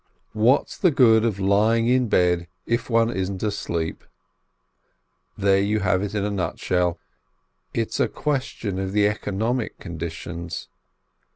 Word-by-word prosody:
What's 115 +5 +2
the 185 - +5
good 115 -7 +5
of 110 -4 0
lying 110 +4 +3
in 125 -1 +2
bed 90 -2 +2 0.2
if 115 +1 -1
one 115 0 +3
isn't 95 -1 -3
asleep? 85 -6 -2 1.3
There 100 0 +3
you 105 +2 0
have 95 -1 +2
it 105 +1 -4
in 100 -1 0
a 105 - -1
nutshell 90 -2 -1 0.4
— - - -47 0.3
it's 115 -1 -1
a - - +3
question 130 -9 -3
of 95 0 -3
the 105 0 +4
economic 110 +3 -2
conditions. 85 0 -6
100 Hz, 135 wpm, -23 LUFS, 95-115 Hz, 1.3 s, the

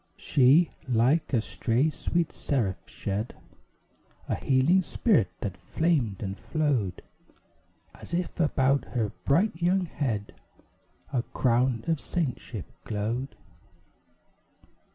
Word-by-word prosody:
She, 145 +6 +4 0.2
like 125 +7 +3
a 120 -5 +3
stray 125 +7 +1
sweet 170 +1 -1
seraph, 115 -10 -2
shed 105 +4 -3 0.9
A - - 0
healing 140 +8 +3
spirit, 185 - +2
that 95 -3 -3
flamed 115 - 0
and 95 -1 -3
flowed 140 - -1 0.9
As - - -12
if 175 0 -2
about 140 -3 +2
her 110 -4 0
bright 170 +5 +2
young 180 +2 +2
head 115 -10 -3 0.8
A 125 - +2
crown 120 -1 +1
of 165 -3 0
saintship 125 - -3 0.2
glowed. 115 +5 -3
130 Hz, 105 wpm, -28 LUFS, 115-160 Hz, 0.9 s, She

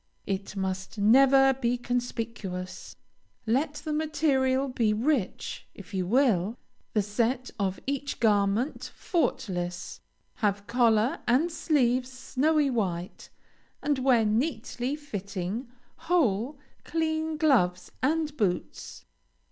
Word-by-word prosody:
It 195 +1 -3
must 190 +1 -3
never 270 +5 +6
be 245 -2 0
conspicuous. 230 -7 -4 0.5
Let 275 +7 +1
the 300 +1 -4
material 275 -4 +1
be 230 -5 +1
rich, 240 -1 -1
if 200 0 -12
you 185 -2 -1
will; 225 -3 +2 0.4
the 210 - +2
set 235 +5 -1
of 190 -2 -1
each 280 +1 -3
garment 210 +4 +1
faultless; 180 - -2 0.4
have 205 -3 0
collar 235 0 +2
and 275 +9 +3
sleeves 255 -5 +1
snowy 285 +3 +1
white, 185 -6 -3 0.5
and 290 -2 +1
wear 250 -4 +4
neatly 245 +2 -1
fitting, 205 -4 -5 0.3
whole, 290 - +1 0.3
clean 315 -1 -1
gloves 210 - +2
and 305 +2 0
boots. 200 -9 -3
245 Hz, 105 wpm, -28 LUFS, 205-280 Hz, 0.5 s, never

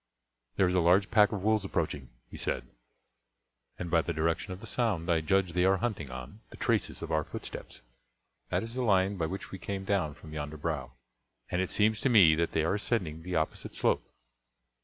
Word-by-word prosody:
"There 95 - +4
is 90 - 0
a 90 - +4
large 90 +3 +4
pack 105 -3 +5
of 100 -3 -3
wolves 110 -1 +2
approaching," 75 -8 -2 0.2
he - - -8
said, - - -2 1.1
"and 85 -2 -5
by 85 -1 +5
the 85 - -3
direction 85 +4 -1
of 90 - -6
the - - -10
sound 105 -9 0
I 80 -1 +3
judge 95 +1 +1
they 90 0 +2
are 95 +1 +4
hunting 100 - -2
on 65 - -8
the - - -12
traces 115 -9 0
of 85 - -5
our 80 -1 +2
footsteps. - - -8 0.7
That - - 0
is 115 +1 -5
the 130 - -2
line 100 -3 +3
by 80 -2 0
which 95 +4 -6
we 95 - -6
came 95 +1 -4
down 90 -7 0
from 75 -1 -12
yonder 75 0 -5
brow, 75 -4 -3 0.6
and 90 - +1
it 95 - -1
seems 110 +1 +2
to 135 - +2
me 95 -10 +7
that 85 +2 0
they 80 - +2
are 80 - +1
ascending 95 -7 -1
the 90 +2 -4
opposite 80 -1 -2
slope." - - +2
90 Hz, 210 wpm, -30 LUFS, 80-100 Hz, 1.1 s, me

